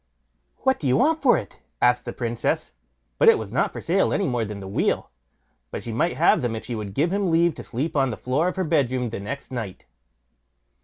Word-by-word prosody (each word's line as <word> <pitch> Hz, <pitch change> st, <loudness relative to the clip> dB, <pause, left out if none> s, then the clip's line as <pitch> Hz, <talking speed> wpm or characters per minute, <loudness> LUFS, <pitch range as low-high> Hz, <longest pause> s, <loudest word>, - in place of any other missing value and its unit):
"What 265 Hz, 0 st, +2 dB
do 145 Hz, -, -2 dB
you 125 Hz, -, +3 dB
want 315 Hz, +5 st, +2 dB
for 255 Hz, -3 st, +5 dB
it?" -, -, -8 dB, 0.2 s
asked 125 Hz, 0 st, +3 dB
the -, -, -4 dB
Princess; 120 Hz, -1 st, -2 dB, 0.5 s
but 465 Hz, -, +7 dB
it 455 Hz, -, +6 dB
was -, -, -7 dB
not -, -, +1 dB
for -, -, -7 dB
sale -, -, +2 dB
any 200 Hz, -, +1 dB
more 120 Hz, -3 st, 0 dB
than 105 Hz, -1 st, -5 dB
the 95 Hz, -, -8 dB
wheel, 95 Hz, -, -1 dB, 0.6 s
but -, -, -6 dB
she 115 Hz, -, -5 dB
might 145 Hz, +10 st, 0 dB
have -, -, +4 dB
them 120 Hz, -3 st, -1 dB
if 110 Hz, -, -6 dB
she 125 Hz, -, -4 dB
would 105 Hz, -3 st, -5 dB
give 165 Hz, +6 st, +1 dB
him 200 Hz, -2 st, +1 dB
leave 170 Hz, 0 st, +3 dB
to -, -, -9 dB
sleep 145 Hz, +7 st, -3 dB
on 135 Hz, -2 st, +3 dB
the 110 Hz, -, -4 dB
floor 140 Hz, +7 st, 0 dB
of 185 Hz, -, -2 dB
her 190 Hz, -, 0 dB
bedroom 130 Hz, -7 st, +1 dB
next 115 Hz, +8 st, -6 dB
night. 115 Hz, -7 st, -6 dB
130 Hz, 225 wpm, -24 LUFS, 115-170 Hz, 0.6 s, but